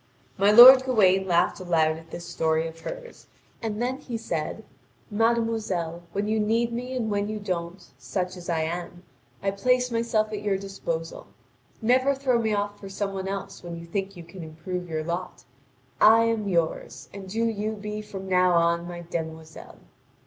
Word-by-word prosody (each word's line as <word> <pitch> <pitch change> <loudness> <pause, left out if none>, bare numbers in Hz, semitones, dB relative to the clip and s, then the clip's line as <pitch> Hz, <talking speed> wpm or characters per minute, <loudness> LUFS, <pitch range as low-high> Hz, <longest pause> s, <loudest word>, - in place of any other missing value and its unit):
My 200 +1 +3
lord 255 +4 +11
Gawain 195 -7 +3
laughed 170 -1 +2
aloud 165 -3 +2
at 165 0 -13
this 170 +1 -8
story 160 -2 0
of 165 0 -10
hers, - - -9 0.3
and 220 -2 -3
then 250 +2 -1
he 250 -5 -6
said: 225 - -4 0.5
"Mademoiselle, 220 -7 0
when 200 +3 -2
you 220 0 +1
need 230 +2 +1
me 250 +2 -4
and 220 -3 -2
when 205 0 -1
you 215 - -3
don't, 180 -3 -4
such 185 -1 -3
as 175 -1 -9
I 165 -2 +1
am, 175 +2 -5 0.4
I 195 - +1
place 250 +5 +1
myself 230 -2 0
at 205 - -4
your 205 -2 0
disposal. 170 -4 -5 0.6
Never 260 +4 +3
throw 260 -3 +1
me 220 -1 0
off 205 0 -2
for 195 - -9
some 195 0 -3
one 190 0 -4
else 195 0 -5
when 170 -1 -7
you 170 - -9
think 195 +2 -4
you 170 - -9
can 175 +2 -11
improve 170 +3 -6
your 155 -1 -2
lot. 170 -5 -5 0.6
I 225 +1 +7
am 225 -2 0
yours, 170 -3 -2
and 195 -1 -9
do 225 +4 0
you 215 -1 -1
be 210 0 -5
from 195 -2 -8
now 180 -1 +3
on 170 0 +2
my 175 0 -7
demoiselle!" 160 -2 -7
195 Hz, 180 wpm, -26 LUFS, 170-220 Hz, 0.6 s, lord